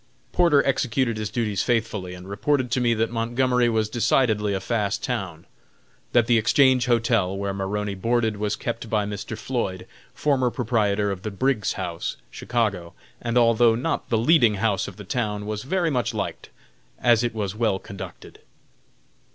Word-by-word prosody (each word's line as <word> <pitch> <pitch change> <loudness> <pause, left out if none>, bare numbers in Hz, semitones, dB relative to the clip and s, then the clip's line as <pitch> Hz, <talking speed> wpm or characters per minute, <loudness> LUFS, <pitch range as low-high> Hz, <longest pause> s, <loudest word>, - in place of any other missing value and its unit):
Porter 165 -6 +4
executed 130 -3 0
his 105 -2 -3
duties 105 -5 -1
faithfully, 110 -6 -1
and 90 +1 -11
reported 125 +6 0
to 125 - +1
me 120 -1 +2
that 115 +1 0
Montgomery 120 +1 +1
was 110 -2 +1
decidedly 110 -2 +1
a - - -1
fast 105 -1 -1
town; - - -4 0.7
that 120 -2 +4
the 115 -1 +4
Exchange 130 +2 +4
Hotel, 115 -5 +2
where 100 0 -2
Maroney 100 +1 -2
boarded, 110 +2 0
was 105 0 -1
kept 115 -1 -5
by 105 -2 +1
Mr. 105 +1 -5
Floyd, 100 -8 -3 0.3
former 135 -4 +1
proprietor 105 -5 0
of 95 -2 -5
the 110 - -4
Briggs 110 +2 0
House, 85 -1 -4
Chicago, 100 -8 -2 0.3
and, 120 0 -1
although 115 -1 +5
not 135 +8 -2
the 115 - +2
leading 120 -3 +4
house 100 -1 0
of - - -10
the 105 - -8
town, 105 0 -2
was 105 0 -3
very 170 - 0
much 125 -4 -1
liked, - - -4 0.5
as 120 -1 +4
it 120 -2 -2
was 100 -3 -2
well 110 -3 +1
conducted. 100 0 -10
115 Hz, 165 wpm, -24 LUFS, 105-120 Hz, 0.7 s, although